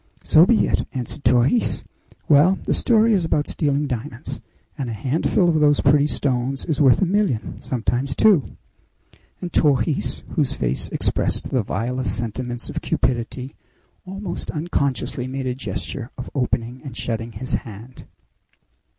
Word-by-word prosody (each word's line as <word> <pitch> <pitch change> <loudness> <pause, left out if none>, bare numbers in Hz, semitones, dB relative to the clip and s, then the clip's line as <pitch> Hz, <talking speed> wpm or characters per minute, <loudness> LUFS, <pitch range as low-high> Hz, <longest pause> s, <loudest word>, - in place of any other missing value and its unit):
"So 165 +4 +6
be 235 -1 +4
it," - - 0
answered 130 +3 -5
Torres. 125 - +2 0.4
"Well, 160 +6 +5
the - - 0
story 225 -1 +4
is 190 -4 +2
about 150 -2 +1
stealing 145 -1 0
diamonds, 125 0 -5 0.3
and 135 -4 -4
a - - -3
handful 150 - +1
of 160 -2 +3
those 145 -1 +4
pretty 145 +1 +4
stones 130 -2 -1
is 155 -3 -1
worth 135 +4 +5
a - - +4
million, 185 - -1
sometimes 130 +2 -1
two!" 200 -10 +3 0.8
And 180 -2 -5
Torres, 140 -1 +1
whose - - 0
face 60 +2 -1
expressed - - -1
the 130 - +2
vilest 125 +3 -2
sentiments 120 +1 -4
of - - -4
cupidity, 125 +2 -2 0.5
almost 195 +2 -5
unconsciously 140 -5 -2
made 135 0 -4
a 125 - 0
gesture 130 -1 -5
of 125 - -7
opening 125 -2 -1
and 135 -5 -8
shutting 115 0 -3
his 125 +6 -5
hand. 115 +1 -11
135 Hz, 145 wpm, -22 LUFS, 120-150 Hz, 0.8 s, So